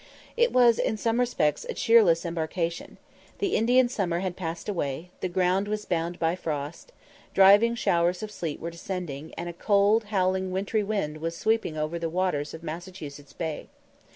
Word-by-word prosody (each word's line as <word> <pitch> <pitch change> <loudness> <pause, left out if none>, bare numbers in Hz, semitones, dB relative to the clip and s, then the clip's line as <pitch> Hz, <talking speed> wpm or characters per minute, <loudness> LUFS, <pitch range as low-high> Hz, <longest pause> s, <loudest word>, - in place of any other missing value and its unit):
It 475 0 +3
was 240 -2 +5
in 215 - 0
some 230 +2 0
respects 155 - +1
a - - -3
cheerless 205 -8 +4
embarkation. 170 0 -3 0.4
The 395 -2 0
Indian 245 +3 +4
summer 180 -8 -1
had 185 -2 -3
passed 165 -2 -5
away; 170 -3 -3
the 185 - -2
ground 185 +2 +1
was 210 0 -3
bound 170 0 -2
by 165 +1 +1
frost; 155 - -5 0.4
driving 205 +5 +6
showers 175 -4 +1
of 215 - -5
sleet 165 -7 -4
were 170 - -5
descending; 170 -4 -6
and 170 - -4
a 175 - -5
cold, 205 +4 +3
howling, 190 -2 0
wintry 200 +3 0
wind 195 -8 -2
was 165 +1 -4
sweeping 220 -6 0
over 155 +2 -2
the 165 -1 -2
waters 165 -4 -1
of 160 - -11
Massachusetts 155 -4 -8
Bay. 160 0 -4
180 Hz, 170 wpm, -27 LUFS, 165-210 Hz, 0.4 s, driving